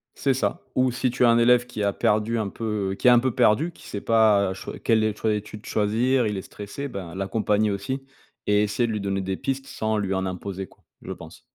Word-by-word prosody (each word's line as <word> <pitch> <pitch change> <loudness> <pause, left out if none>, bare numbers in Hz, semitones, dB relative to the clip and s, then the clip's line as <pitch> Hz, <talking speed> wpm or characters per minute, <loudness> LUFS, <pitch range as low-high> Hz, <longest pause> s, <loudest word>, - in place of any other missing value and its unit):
C'est 135 - +1
ça. 130 - -1
Ou 130 0 +3
si 125 +1 0
tu 125 +1 0
as - - +6
un 115 - +5
élève 120 +1 +5
qui 110 -4 -4
a 100 -1 +1
perdu 110 +4 +1
un 105 -3 -1
peu, 105 -2 -3
heu, - - -3
qui 125 - 0
est - - +10
un 120 - +7
peu 130 0 0
perdu, 145 +13 +3
qui - - -16
sait 100 - -5
pas, 110 -4 +4
heu, - - -3
choix 95 - -8
quel 110 -2 +2
est 110 - +2
le - - -11
choix 110 - -1
d'étude 105 0 -5
choisir, 115 +4 +1
il 105 -1 -2
est - - -3
stressé, 105 +9 -7
bah 95 -9 -7
l'accompagner 105 +2 0
aussi 130 +8 -3 0.4
et 105 0 +4
essayer 105 +3 0
de - - -2
lui 105 - -2
donner 95 -1 -1
des 95 0 -3
pistes 135 0 -3
sans 110 0 -2
lui 100 -2 -1
en 95 0 -1
imposer, 95 +1 -5
quoi. - - -25 0.2
Je - - -7
pense. - - -12
105 Hz, 260 wpm, -24 LUFS, 100-120 Hz, 0.4 s, est